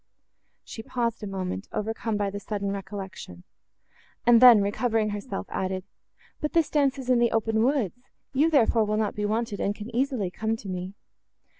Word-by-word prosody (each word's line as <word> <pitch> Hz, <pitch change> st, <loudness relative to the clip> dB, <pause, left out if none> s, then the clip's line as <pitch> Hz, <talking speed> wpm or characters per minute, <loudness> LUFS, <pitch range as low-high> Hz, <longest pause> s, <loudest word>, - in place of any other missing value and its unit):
She 225 Hz, -, -8 dB
paused 235 Hz, 0 st, -2 dB
a 210 Hz, -, -5 dB
moment, 190 Hz, 0 st, -4 dB
overcome 225 Hz, 0 st, -2 dB
by 200 Hz, -1 st, -1 dB
the 205 Hz, -, -5 dB
sudden 200 Hz, -1 st, -3 dB
recollection, 190 Hz, -, -7 dB, 0.8 s
and 240 Hz, -1 st, +6 dB
then, 245 Hz, -4 st, +10 dB
recovering 215 Hz, +1 st, 0 dB
herself, 200 Hz, -, -5 dB
added—"But 190 Hz, +9 st, -6 dB
this 330 Hz, -2 st, +2 dB
dance 280 Hz, -2 st, +2 dB
is 255 Hz, -1 st, -2 dB
in 245 Hz, -, +4 dB
the 235 Hz, 0 st, +4 dB
open 225 Hz, 0 st, +1 dB
woods; 245 Hz, -, +1 dB, 0.3 s
you, 295 Hz, +5 st, +3 dB
therefore, 235 Hz, -6 st, +4 dB
will 210 Hz, 0 st, 0 dB
not 215 Hz, -2 st, 0 dB
be 210 Hz, -, -2 dB
wanted, 215 Hz, -1 st, -1 dB
and 200 Hz, -, -1 dB
can 220 Hz, +3 st, -8 dB
easily 250 Hz, -8 st, 0 dB
come 220 Hz, +4 st, -1 dB
to 215 Hz, -, -10 dB
me." 185 Hz, +1 st, -5 dB
215 Hz, 170 wpm, -26 LUFS, 200-240 Hz, 0.8 s, then